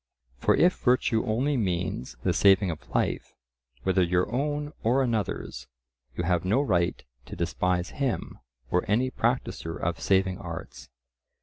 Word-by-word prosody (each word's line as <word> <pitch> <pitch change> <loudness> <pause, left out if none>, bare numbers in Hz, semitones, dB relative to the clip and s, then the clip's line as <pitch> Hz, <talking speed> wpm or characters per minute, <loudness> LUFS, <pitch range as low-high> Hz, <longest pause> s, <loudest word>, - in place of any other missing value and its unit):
For - - +3
if 180 +2 +3
virtue 125 -2 +2
only 130 +6 +1
means 90 - -2
the - - +2
saving 95 -2 +4
of 80 - -9
life, - - -1 0.5
whether 95 0 +2
your 90 +4 +1
own 145 +3 -1
or 125 +4 +3
another's, 105 - -2 0.5
you 90 - -2
have 90 -1 +1
no 100 +8 +2
right 90 - +1 0.2
to - - -7
despise 90 +1 -1
him 135 -5 -2 0.3
or 90 - +2
any 125 +5 +2
practiser 115 -10 -1
of 85 0 -2
saving 95 -1 +2
arts. 85 -6 -8
95 Hz, 140 wpm, -27 LUFS, 90-125 Hz, 0.5 s, saving